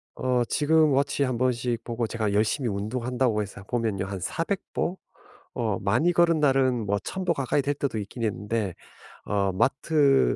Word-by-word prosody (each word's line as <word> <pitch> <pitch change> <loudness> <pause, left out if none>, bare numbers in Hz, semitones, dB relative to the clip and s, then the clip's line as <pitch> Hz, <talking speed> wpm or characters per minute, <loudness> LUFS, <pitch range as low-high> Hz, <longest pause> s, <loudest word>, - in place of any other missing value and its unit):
어 125 -1 +1
지금 155 0 +3
워치 140 +1 +1
1 130 -3 -1
번씩 120 -2 0
보고 115 0 -2
제가 110 -2 -2
열심히 110 +5 +1
운동한다고 115 +3 -1
해서 100 -1 -7
보면요, 110 -3 -1
한 95 0 -5
400 165 - -2
보 180 - -1 0.6
어 110 -5 0
많이 120 - +2
걸은 170 -2 +3
날은 130 -5 +2
뭐 100 0 +1
1,000 190 - -5
보 175 - +2
가까이 140 -1 0
될 145 +1 -1
때도 140 -5 -2
있긴 105 +4 -6
있는데 105 -1 -1 0.5
어 100 -1 +1
마트 135 - +3
120 Hz, 285 characters per minute, -26 LUFS, 105-140 Hz, 0.6 s, 지금